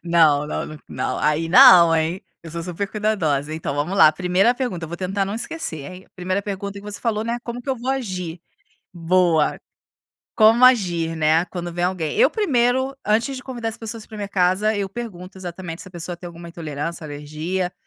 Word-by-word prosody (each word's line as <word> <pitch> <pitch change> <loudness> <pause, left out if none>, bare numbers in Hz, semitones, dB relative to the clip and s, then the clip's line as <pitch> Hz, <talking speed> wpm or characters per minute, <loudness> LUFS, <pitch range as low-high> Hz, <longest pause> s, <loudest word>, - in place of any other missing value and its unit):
não, 160 -4 +3
não, - - -3
n 155 0 -9
não - - -3
aí 150 +2 +1
não 170 -1 +8
hein, 165 +3 -1 0.2
eu 165 - -9
sou 170 +1 -5
super 180 +3 -4
cuidadosa. 160 -10 0
Então, 160 -3 -4
vamos 150 +7 -2
lá, 155 - +8
primeira 185 +7 +2
pergunta 240 -10 -3
eu - - -8
vou 170 - -6
tentar 195 +2 -1
não 195 +2 -4
esquecer, 220 - -5
hein, 185 +1 -12
primeira 185 +2 -2
pergunta 200 0 -5
que - - -11
você 205 0 -7
falou, 220 -3 -1
né, 235 +1 -2
como 240 0 -6
é - - -8
que 275 - -12
eu 265 - -1
vou 250 +2 -3
agir? 185 -10 -4 0.5
Boa, 170 -2 +2 0.8
como 225 +3 +6
agir, 175 -10 +3
né, 160 +2 +3
quando 175 -2 -6
vem 175 +1 -1
alguém, 180 -3 -2
eu - - +6
primeiro 260 - +1
antes 230 +6 +1
de 255 - -8
convidar 240 -3 -4
as 225 - -6
pessoas 225 -1 -6
para 220 - -10
minha 205 -1 -4
casa 195 +3 +2
eu 200 -1 -2
pergunto 190 -4 -8
exatamente 175 -2 -7
se 185 - -11
a - - -18
pessoa 175 0 -5
tem 175 - -10
alguma 170 0 -10
intolerância, 165 0 -5
alergia, 155 +5 -4
185 Hz, 205 wpm, -22 LUFS, 165-215 Hz, 0.8 s, não